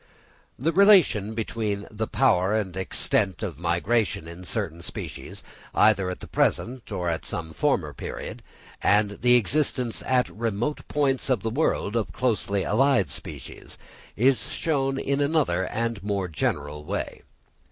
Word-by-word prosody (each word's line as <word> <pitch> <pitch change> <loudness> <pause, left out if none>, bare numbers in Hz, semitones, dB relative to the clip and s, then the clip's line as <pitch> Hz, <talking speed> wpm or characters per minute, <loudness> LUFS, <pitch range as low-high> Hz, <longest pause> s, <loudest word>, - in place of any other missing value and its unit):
The 155 +7 +1
relation 170 - +5
between 110 -2 -2
the 110 +1 -3
power 105 -6 +2
and 95 -5 -2
extent 95 +1 +1
of 85 -8 -4
migration 90 +2 0
in 85 +2 -9
certain 85 -1 -3
species, - - -6 0.3
either 100 -3 +4
at 90 - -6
the - - -8
present 125 -1 0
or 90 -3 -2
at 80 -1 -1
some 80 -1 -5
former 90 - 0
period, - - -7 0.4
and 105 0 +2
the 125 +1 +5
existence 125 0 +1
at 130 -1 +3
remote 115 +5 -3
points 140 -2 0
of 120 -8 +1
the 110 - -1
world 120 -5 0
of 115 -3 -1
closely 100 -5 0
allied 130 -3 +3
species, - - -7 0.4
is 130 +4 +2
shown 135 -4 0
in 140 +1 0
another 140 - +1
and 115 -1 -2
more 100 -2 -1
general 75 -2 -2
way. - - -4
110 Hz, 140 wpm, -25 LUFS, 95-130 Hz, 0.4 s, relation